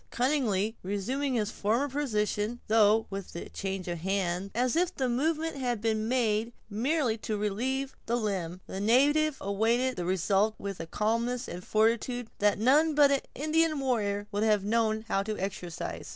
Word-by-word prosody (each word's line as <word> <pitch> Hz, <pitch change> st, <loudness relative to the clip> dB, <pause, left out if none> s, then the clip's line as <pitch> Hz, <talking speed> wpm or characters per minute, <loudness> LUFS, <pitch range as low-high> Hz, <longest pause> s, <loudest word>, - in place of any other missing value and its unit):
Cunningly 235 Hz, -6 st, +1 dB
resuming 250 Hz, +8 st, -2 dB
his 215 Hz, -2 st, 0 dB
former 230 Hz, +7 st, 0 dB
position, 230 Hz, -5 st, -1 dB
though 220 Hz, 0 st, +4 dB
with 195 Hz, -3 st, -6 dB
a 170 Hz, -, -6 dB
change 195 Hz, -2 st, -4 dB
of 170 Hz, -1 st, -3 dB
hands, 190 Hz, +1 st, -1 dB
as 250 Hz, +3 st, +1 dB
if 360 Hz, +1 st, +1 dB
the 260 Hz, -, 0 dB
movement 310 Hz, +5 st, 0 dB
had 245 Hz, -4 st, -1 dB
been 220 Hz, 0 st, 0 dB
made 230 Hz, -2 st, +1 dB, 0.2 s
merely 245 Hz, +1 st, 0 dB
to 215 Hz, 0 st, -3 dB
relieve 255 Hz, +7 st, -2 dB
the 235 Hz, -, +1 dB
limb, 190 Hz, -6 st, -2 dB
the 190 Hz, -, -6 dB
native 280 Hz, +7 st, +3 dB
awaited 230 Hz, +6 st, +1 dB
the 175 Hz, -, -2 dB
result 195 Hz, +4 st, +1 dB
with 195 Hz, -2 st, -6 dB
a 165 Hz, -, -5 dB
calmness 230 Hz, +6 st, -1 dB
and 180 Hz, +1 st, -7 dB
fortitude 230 Hz, +3 st, +1 dB
that 205 Hz, 0 st, +3 dB
none 290 Hz, +8 st, +4 dB
but 290 Hz, -1 st, +6 dB
an 275 Hz, -, +2 dB
Indian 310 Hz, +1 st, +1 dB
warrior 210 Hz, -6 st, 0 dB
would 205 Hz, 0 st, -1 dB
have 210 Hz, -2 st, +3 dB
known 220 Hz, +1 st, +1 dB
how 195 Hz, -, +1 dB
to 215 Hz, +1 st, -4 dB
exercise. 180 Hz, -3 st, -5 dB
220 Hz, 165 wpm, -29 LUFS, 200-260 Hz, 0.2 s, but